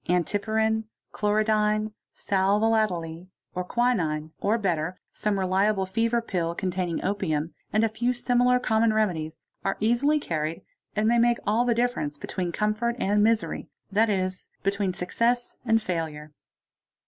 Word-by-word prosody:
Antipyrin, 220 +5 +1 0.3
chlorodyne, 215 0 +1 0.2
sal 195 +1 +1
volatile, 185 -7 0 0.3
and 180 0 -3
quinine, 165 -12 0
or 215 +3 +2
better 180 -4 -1
some 210 -2 -1
reliable 190 +1 +2
fever 230 +4 +1
pill 170 -6 -2
containing 180 -2 -2
opium, 170 -5 -1 0.2
and 215 +1 +2
a - - +4
few 235 +3 0
similar 245 0 +3
common 220 -2 +2
remedies, 160 -7 -1 0.2
are 195 - -1
easily 240 +8 +3
carried 160 - -3 0.3
and 210 +1 +2
may 235 +1 +4
make 240 0 +4
all 220 +4 +2
the 240 -1 +2
difference 235 -12 -1
between 175 +3 -3
comfort 215 +4 0
and 205 -2 +2
misery, 225 0 +1 0.2
that 215 +3 +3
is, 185 -2 -2
between 195 -1 0
success 235 +7 0
and 225 -1 +3
failure. 155 -4 -3
210 Hz, 135 wpm, -26 LUFS, 180-225 Hz, 0.3 s, a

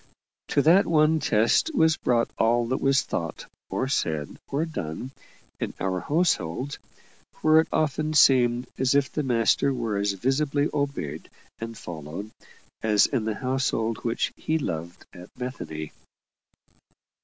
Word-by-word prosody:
To 140 - +2
that 175 +6 +5
one 155 0 +3
test 115 - +2
was 160 -7 +4
brought 120 -5 +1
all 120 +1 +3
that 130 - -1
was 135 0 +3
thought, 85 -1 -4 0.2
or 130 - -1
said, 80 - -2
or 145 +4 -1
done, 125 - -5 0.5
in - - -4
our 95 -1 -1
household, 145 - 0 0.6
where 155 0 +6
it 160 - +2
often 155 0 0
seemed 125 -3 +5
as 130 +1 +2
if 140 -2 +2
the 150 - -1
Master 125 +1 +2
were 115 -5 -2
as 100 0 0
visibly 140 +7 0
obeyed 140 - -3 0.3
and 115 0 -6
followed 85 +5 -7 0.5
as 105 -2 +4
in 125 -6 -1
the 110 -1 -1
household 125 -4 -1
which 120 +1 -1
He 160 - -1
loved 85 - -5
at 90 -1 -12
Bethany. 80 -12 -6
125 Hz, 140 wpm, -26 LUFS, 105-145 Hz, 0.6 s, where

